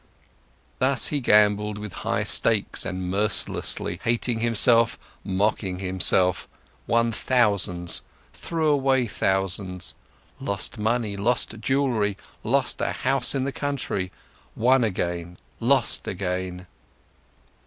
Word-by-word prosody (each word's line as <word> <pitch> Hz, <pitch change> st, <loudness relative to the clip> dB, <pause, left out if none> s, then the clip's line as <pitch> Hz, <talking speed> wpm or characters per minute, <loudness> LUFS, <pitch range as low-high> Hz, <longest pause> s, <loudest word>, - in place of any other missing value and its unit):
Thus 130 Hz, 0 st, +2 dB
he 145 Hz, -2 st, -1 dB
gambled 105 Hz, -2 st, +3 dB
with 105 Hz, -2 st, -7 dB
high -, -, -1 dB
stakes 110 Hz, -3 st, +2 dB
and 95 Hz, -1 st, -4 dB
mercilessly, 100 Hz, -3 st, 0 dB
hating 115 Hz, 0 st, 0 dB
himself, 115 Hz, 0 st, +3 dB, 0.3 s
mocking 95 Hz, -1 st, -1 dB
himself, 90 Hz, -1 st, +2 dB, 0.4 s
won 115 Hz, 0 st, +2 dB
thousands, 100 Hz, -8 st, +1 dB, 0.3 s
threw 160 Hz, -2 st, -2 dB
away 135 Hz, -3 st, +2 dB
thousands, 95 Hz, -3 st, -2 dB, 0.5 s
lost 100 Hz, +3 st, -3 dB
money, 110 Hz, -1 st, -1 dB
lost 115 Hz, +1 st, +1 dB
jewelry, 115 Hz, -5 st, 0 dB, 0.3 s
lost 135 Hz, +4 st, +1 dB
a -, -, 0 dB
house 130 Hz, 0 st, 0 dB
in 135 Hz, -, 0 dB
the 140 Hz, -, -2 dB
country, 135 Hz, -11 st, -3 dB, 0.4 s
won 125 Hz, +2 st, +3 dB
again, 85 Hz, -4 st, -3 dB, 0.2 s
lost 125 Hz, +1 st, +2 dB
again. 90 Hz, -1 st, -4 dB
105 Hz, 105 wpm, -24 LUFS, 95-125 Hz, 0.5 s, gambled